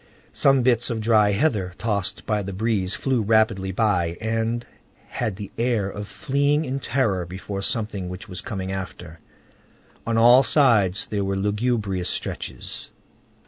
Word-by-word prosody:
Some 135 -2 +4
bits 120 -1 +2
of 115 -2 -2
dry 110 -2 +4
heather, 100 -5 0
tossed 105 -4 -2
by 105 -1 0
the 100 0 -5
breeze, 100 -3 0
flew 130 +4 0
rapidly 105 -3 +2
by, 90 -5 +1
and 115 +1 -1 0.4
had 105 - -3
the 100 0 -8
air 115 -5 +1
of 105 0 -6
fleeing 145 +5 0
in 135 0 -2
terror 115 -9 0
before 95 +3 -6
something 100 -3 -2
which 95 +4 -8
was 90 -2 -5
coming 95 -3 -4
after. 90 -3 -7 0.9
On 115 0 +1
all 120 +3 +7
sides 115 - +3
there 100 -2 -2
were 95 0 -1
lugubrious 105 -2 -1
stretches. - - -4
105 Hz, 145 wpm, -23 LUFS, 95-115 Hz, 0.9 s, all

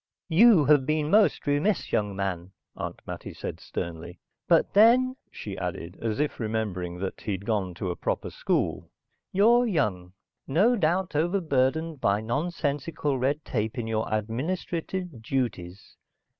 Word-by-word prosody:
"You 185 -2 +6
have 140 -2 +4
been 155 0 0
most 205 -6 +4
remiss, 145 +8 +1
young 105 -2 0
man," 95 -2 -3 0.2
Aunt - - -5
Mattie - - -7
said - - -6
sternly. 85 +1 -6 0.3
"But - - +3
then," 245 +5 +5
she 100 -3 -7
added, 90 -1 -5
as 115 0 -2
if 150 0 -1
remembering 105 -6 -2
that 95 +1 -5
he 105 - -2
had 95 +1 -5
gone 100 -6 -1
to 90 +1 -3
a - - -4
proper - - -3
school, - - -1 0.4
"you're 235 +5 +4
young. 100 - -1 0.3
No 200 - +3
doubt 175 -2 0
overburdened 160 -3 +1
by 100 +1 +2
nonsensical 145 +2 -2
red 140 +4 0
tape 110 +1 -2
in 120 - -2
your 110 -1 -2
administrative 160 - -3
duties. 105 -7 -3
130 Hz, 145 wpm, -27 LUFS, 100-165 Hz, 0.4 s, You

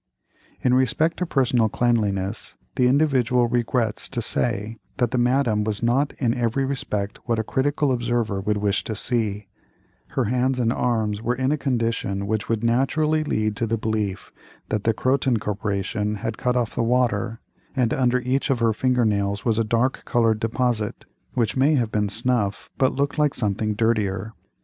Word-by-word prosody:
In 125 - +2
respect 145 +6 +2
to 180 - -2
personal 125 -6 +2
cleanliness, 105 -4 -1 0.2
the 125 - +3
Individual 125 -3 +3
regrets 120 -2 0
to 125 - -3
say 115 -1 -1 0.2
that 120 -4 +1
the 125 - +1
Madame 120 -3 +2
was 105 +1 -2
not 135 +5 +2
in 120 -4 +1
every 120 +2 0
respect 105 -7 -3
what 115 -2 +1
a 110 - 0
critical 145 +4 0
observer 120 -4 -1
would 105 +2 0
wish 100 -1 0
to 110 - -3
see; 105 -3 -1 0.7
her 130 - +3
hands 125 +3 +1
and 120 -2 +1
arms 110 -5 0
were 120 +2 0
in 130 +2 0
a - - +3
condition 115 -8 -1
which 110 +1 -2
would 115 -1 0
naturally 150 +6 +2
lead 110 -7 -1
to 115 - -1
the 115 +1 0
belief 105 -3 -2 0.4
that 110 -1 -2
the 115 - +3
Croton 130 -1 +1
Corporation 105 0 -2
had 105 +2 -4
cut 125 +2 -1
off 120 -3 0
the - - -1
water; 115 -2 +1 0.4
and 125 -4 +1
under 125 -1 +2
each 130 +4 0
of 135 - +2
her 115 -1 +2
finger 125 +1 +1
nails 100 -1 0
was 115 -2 +2
a - - +3
dark 115 +4 0
colored 115 -3 +2
deposit, 115 -1 -1 0.3
which 115 -4 0
may 140 +4 +3
have 120 -5 0
been 105 -2 0
snuff, 110 -2 0
but 130 -1 +2
looked 140 +2 -1
like 150 -2 +2
something 105 -1 -1
dirtier. 105 -2 0
115 Hz, 175 wpm, -23 LUFS, 105-125 Hz, 0.7 s, the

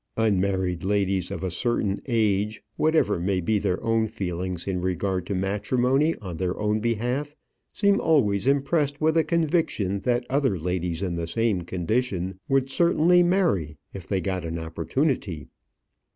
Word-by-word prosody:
Unmarried 95 -4 +1
ladies 95 -2 0
of 85 - -5
a 95 - -1
certain 105 0 0
age, 105 -3 0
whatever 155 - +2
may 95 +2 0
be 105 +4 +1
their 90 -2 -1
own 115 -1 +2
feelings 90 -3 -4
in 95 -2 -2
regard 90 0 -1
to 100 - -2
matrimony 125 - +1
on 90 -6 -7
their 90 0 -2
own 105 0 +1
behalf, 125 +6 -2 0.4
seem 200 -1 +2
always 110 -10 +2
impressed 140 +1 +1
with 155 +1 +2
a 165 - +4
conviction 155 - 0
that 120 +2 0
other 135 -6 +1
ladies 90 +1 -2
in 90 -3 -1
the 85 -1 -3
same 110 +1 0
condition 95 +1 -2
would 135 -1 +2
certainly 170 +4 +4
marry 170 - +1 0.2
if 95 -4 -8
they 95 - 0
got 95 -1 -2
an 85 0 -4
opportunity. 85 - -2
100 Hz, 150 wpm, -25 LUFS, 90-135 Hz, 0.4 s, a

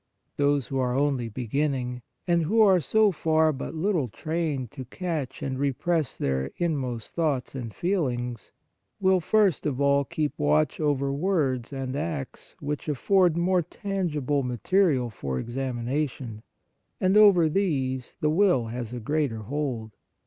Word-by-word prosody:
Those 145 -2 +2
who 135 - -3
are 125 -1 0
only 135 -4 +1
beginning, 125 +1 -2 0.2
and 170 -1 +2
who 205 +9 +1
are 190 -3 +6
so 215 +7 +3
far 160 -2 +2
but 140 +4 -6
little 165 -4 0
trained 150 -1 -3
to 130 - -7
catch 150 -2 -4
and 130 -1 -3
repress 145 +2 0
their 65 0 -1
inmost 130 -9 -2
thoughts 150 -7 -1
and 120 -4 -5
feelings, 125 - -2 0.5
will 190 -1 +4
first 195 -3 +2
of 135 -3 -2
all 140 0 +3
keep 150 +1 -3
watch 75 +1 +2
over 140 -3 +1
words 140 -7 0
and 135 -1 -4
acts 150 -3 -5
which 150 +1 -4
afford 175 +4 +3
more 180 +1 +2
tangible 160 -6 -2
material 130 - +1
for 70 -10 -4
examination, 125 - -3 0.6
and 185 +1 +2
over 200 -6 +7
these 135 - -1
the 150 - +2
will 175 - +3
has 120 0 -5
a 125 - -4
greater 125 -3 -1
hold. 125 -4 -3
145 Hz, 140 wpm, -26 LUFS, 125-170 Hz, 0.6 s, over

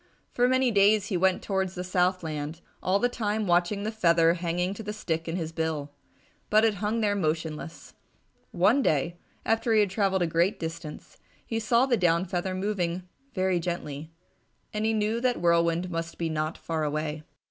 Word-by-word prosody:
For 245 0 +2
many 260 -1 +3
days 205 0 +4
he 195 - -1
went 185 +1 +2
towards 190 -2 -1
the 180 - -4
south 180 0 +1
land, 155 +1 -4 0.2
all 185 +2 +2
the 245 - +2
time 215 -3 -2
watching 175 +3 +2
the 215 - -2
feather 170 -6 +4
hanging 175 +2 -1
to 200 - -8
the 210 -1 -5
stick 165 -6 -3
in 165 - -2
his 165 -3 -3
bill. 160 -3 -2 0.6
But 215 +1 +5
it 220 - +3
hung 220 +2 0
there 205 -2 +2
motionless. 160 -2 -3 0.6
One 205 +10 +3
day, 165 - +1 0.3
after 225 +1 +1
he - - +5
had 205 -3 +2
travelled 195 -2 +1
a - - +2
great 170 +5 +1
distance, 160 -1 -7 0.3
he 225 - -2
saw 235 +3 +3
the 250 -3 +2
down 175 -1 +2
feather 185 +1 -2
moving 185 -2 -2 0.3
very 185 -2 +1
gently, 160 -3 -5 0.6
and 210 0 -1
he 225 - +2
knew 220 +2 0
that 250 -1 +1
Whirlwind 170 +1 +2
must 165 0 -4
be 165 -1 -1
not 155 0 -2
far 160 -2 -3
away. 150 +1 -2
180 Hz, 185 wpm, -27 LUFS, 165-210 Hz, 0.6 s, But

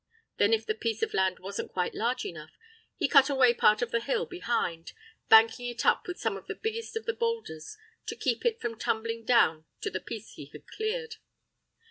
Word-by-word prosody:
Then 205 - +3
if 225 0 +2
the 215 - 0
piece 225 0 -2
of - - -1
land 190 -1 +1
wasn't 195 +2 -6
quite 180 -1 -1
large 245 +3 -1
enough, 155 -2 -7 0.5
he - - 0
cut 275 -3 +6
away 260 -4 +5
part 215 -1 +4
of 235 - -4
the 235 - +2
hill 475 - -1
behind, 235 - -3 0.4
banking 225 +2 +6
it 240 -1 -4
up - - +3
with 360 - -5
some 225 -3 -1
of 195 - -10
the - - -4
biggest 450 +1 -4
of 450 - -6
the 460 - 0
boulders, 455 - -3 0.3
to - - -3
keep - - -1
it 470 -1 +1
from 230 -2 -4
tumbling 230 +1 -2
down 230 -10 +4
on 155 - -29 0.2
to 420 - -2
the - - -3
piece - - -8
he - - -10
had - - -12
cleared. 455 +1 -4
235 Hz, 210 wpm, -29 LUFS, -, 0.5 s, cut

